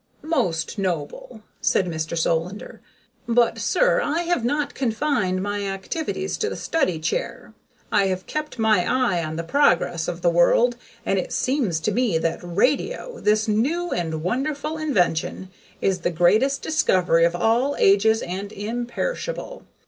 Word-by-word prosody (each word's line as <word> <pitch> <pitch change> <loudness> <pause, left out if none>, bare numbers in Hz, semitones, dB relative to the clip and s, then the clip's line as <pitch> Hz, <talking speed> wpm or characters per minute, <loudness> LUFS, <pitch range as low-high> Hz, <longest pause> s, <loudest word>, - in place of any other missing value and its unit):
"Most 185 - -1
noble," 185 +5 -4 0.2
said 190 - +2
Mr. 160 -1 -3
Solander. 165 +4 -2 0.5
"But, 235 0 +2
sir, - - +2
I 330 -2 0
have 345 -7 0
not 290 +4 -1
confined 225 -7 0
my 205 0 -2
activities 310 - -3
to 435 - 0
the - - -5
study 185 - 0
chair. 160 - -3 0.4
I 200 -2 +3
have 185 -1 -3
kept 305 -3 -4
my 220 -5 +3
eye 205 -7 +1
on 155 0 -4
the 165 - -3
progress 175 - +2
of 175 0 -5
the 175 - +4
world. 230 +8 +4 0.3
And 195 - +1
it - - -4
seems 255 - 0
to 215 - 0
me 225 -5 +1
that 165 +1 -1
radio, 275 - -1
this 215 +1 +2
new 295 +12 0
and 160 -2 -2
wonderful 285 - -2
invention, 185 - 0 0.3
is 190 -1 +1
the 175 - 0
greatest 210 - +2
discovery 180 - +2
of 170 +1 +2
all 240 +9 +2
ages 215 +3 +4
and 195 +3 -5
imperishable. 240 - -4
210 Hz, 150 wpm, -23 LUFS, 175-280 Hz, 0.5 s, the